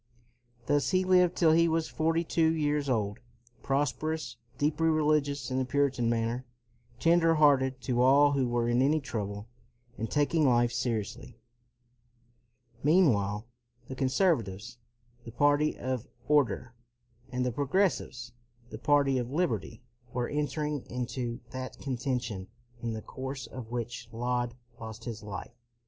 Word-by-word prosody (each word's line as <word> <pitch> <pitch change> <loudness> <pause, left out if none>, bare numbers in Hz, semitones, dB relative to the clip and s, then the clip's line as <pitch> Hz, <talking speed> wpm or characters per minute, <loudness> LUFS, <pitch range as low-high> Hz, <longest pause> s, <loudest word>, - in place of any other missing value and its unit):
Thus 145 -1 +2
he 185 0 +2
lived 180 -1 +4
till 165 -3 +4
he 170 +1 +5
was 160 0 0
forty 165 +1 0
two 160 -1 +2
years 150 -2 0
old, 105 -4 0 0.4
prosperous, 145 0 -1 0.2
deeply 150 +2 +1
religious 150 -4 +1
in 130 - 0
the - - +1
Puritan 135 -2 +1
manner, 115 +2 -1 0.6
tender 165 0 +4
hearted 135 -4 +4
to 125 -1 0
all 140 +3 +6
who 135 -3 +1
were 120 -1 0
in 120 +1 +2
any 150 +4 +3
trouble, 105 -6 -5 0.5
and 115 - -2
taking 150 +1 +2
life 120 -1 +3
seri 115 -2 0
ously. 100 - -10 1.4
Meanwhile 120 - +3 0.4
the - - -4
conservatives, 125 - 0 0.4
the 115 - -9
party 145 +5 +2
of 130 0 -3 0.2
order, 140 -4 +2 0.6
and 125 0 -1
the 125 - 0
progressives, 140 - 0 0.4
the 110 - -7
party 140 -1 +3
of 120 -1 -3
liberty, 125 - -2 0.3
were 120 -1 -1
entering 150 -1 -2
into 120 0 -4
that 130 0 -6
conten 130 -1 -2
tion 100 -6 -6 0.3
in 115 -1 -2
the 110 - -6
course 130 -1 -6
of 115 0 -9
which 120 0 -5
Laud 120 +1 -1 0.2
lost 110 0 -8
his 115 -2 -6
life. 105 -1 -7
130 Hz, 140 wpm, -29 LUFS, 120-150 Hz, 1.4 s, all